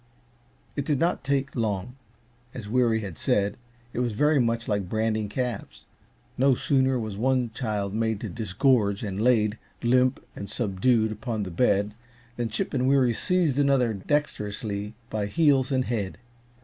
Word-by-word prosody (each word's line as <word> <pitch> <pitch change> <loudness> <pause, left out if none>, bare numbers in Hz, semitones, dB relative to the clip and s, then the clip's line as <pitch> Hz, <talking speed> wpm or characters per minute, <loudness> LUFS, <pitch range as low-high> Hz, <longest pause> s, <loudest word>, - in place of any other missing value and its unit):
It 140 - -1
did 145 0 0
not 170 +2 +1
take 140 0 -1
long 110 0 -2 0.6
as 115 -5 -6
Weary 115 -1 +2
had 95 -6 -7
said, 100 0 +1 0.4
it - - -3
was 120 -3 0
very 150 +6 +3
much 115 -1 0
like 100 -4 -1
branding 110 -1 0
calves. 125 -1 -4 0.5
No 135 0 +5
sooner 130 0 +2
was 110 -4 -4
one 125 0 +1
child 105 -5 -2
made 110 -1 0
to - - -3
disgorge 110 -1 +1
and 100 -1 -3
laid, 110 -3 +3 0.2
limp 125 +1 +3 0.2
and 100 - -7
subdued, 110 +2 +1
upon 110 0 -3
the 95 - -5
bed, 100 +1 +2 0.4
than 120 -1 -2
Chip 105 - -3
and 130 -1 +1
Weary 130 -3 +4
seized 165 -2 +1
another 135 -5 +3
dexterously 105 -3 -2 0.2
by 105 -2 -1
heels 140 0 +3
and 130 -1 +1
head. 105 -6 -2
115 Hz, 155 wpm, -26 LUFS, 105-130 Hz, 0.6 s, No